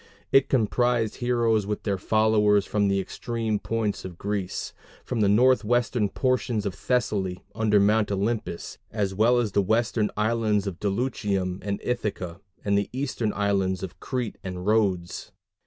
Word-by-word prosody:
It 135 - +5
comprised 120 -1 +1
heroes 115 -4 +1
with 105 - -3
their 100 -3 -1
followers 105 -1 +3
from 105 -1 +1
the 100 0 +2
extreme 110 +1 -2
points 115 -2 -2
of 90 -2 -8
Greece 100 -2 -3 0.3
from 120 -3 -1
the 100 - +4
northwestern 120 -1 +3
portions 125 -4 0
of 100 - -1
Thessaly 100 -8 -1
under 105 -2 +3
Mount 105 +1 +3
Olympus, 100 -2 -2
as 100 -3 -1
well 115 +5 +4
as 115 -4 +1
the 100 - +3
western 110 +1 +1
islands 110 -2 +1
of 95 -3 -5
Dulichium 100 -4 -1
and 100 -1 -3
Ithaca, 100 -7 -3 0.2
and 100 -1 +2
the 100 0 +1
eastern 130 -4 -2
islands 100 -2 0
of 95 - -7
Crete 125 -5 -3
and 90 -1 -5
Rhodes. 100 -5 0
105 Hz, 150 wpm, -26 LUFS, 100-115 Hz, 0.3 s, It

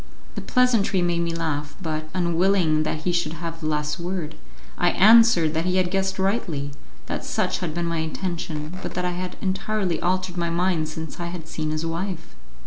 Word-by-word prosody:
The - - -4
pleasantry 230 -7 +3
made 175 -1 +1
me 170 0 -1
laugh, 150 -3 -2
but, 155 -3 -3
unwilling 175 -2 +3
that 155 0 -2
he 180 - +1
should 175 -3 0
have 165 0 -6
the 155 - -2
last 150 0 -1
word, 175 -2 -3 0.4
I - - +3
answered 215 -6 +6
that 165 +1 0
he 180 0 +1
had 180 -1 +2
guessed 195 0 0
rightly, 185 -8 -1 0.3
that - - -4
such - - 0
had 170 -4 -3
been 175 0 -1
my 170 -1 -1
intention, 165 0 -4
but - - -5
that 180 0 -1
I 180 - +1
had 180 +1 -5
entirely 195 -2 -1
altered 185 0 0
my 170 -1 0
mind 170 -2 +1
since 160 +1 -6
I 170 - -3
had 170 -2 -6
seen 155 -1 -3
his 155 +1 -2
wife. 175 +1 -4
170 Hz, 195 wpm, -24 LUFS, 160-185 Hz, 0.4 s, answered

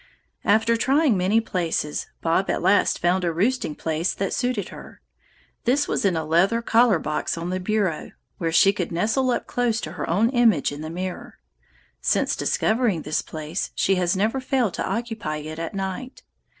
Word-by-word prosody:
"After 220 +2 +3
trying 270 +2 +3
many 190 +4 +2
places, 170 -8 -2
Bob 170 +4 +1
at - - -1
last 195 +3 +3
found 180 +2 +1
a 170 - +1
roosting 195 -1 0
place 160 +2 -1
that 195 -1 -2
suited 245 -7 -1
her. - - -12 0.7
This 265 +5 +2
was - - -1
in 190 -3 +2
a 160 - -2
leather 175 +9 +3
collar 230 -4 +4
box 155 +1 -2
on 170 +2 -4
the 185 - -1
bureau, 190 -4 -1 0.3
where 165 -2 -1
she 195 +4 +5
could 180 -4 -3
nestle 220 +10 +1
up 245 - 0
close 240 -2 0
to 155 - -5
her 160 -3 -5
own 210 +8 +2
image 230 - +3
in 145 +1 -7
the 155 - -5
mirror. 180 +2 -6 0.6
Since - - +1
discovering 220 -7 +1
this 150 +1 -1
place 155 +3 -5
she 195 - +2
has 180 +1 +1
never 220 +7 +1
failed 255 -6 0
to - - -3
occupy 225 -9 -3
it 155 +1 -7
at 165 +3 -5
night. 195 +7 -5
190 Hz, 180 wpm, -23 LUFS, 165-230 Hz, 0.7 s, she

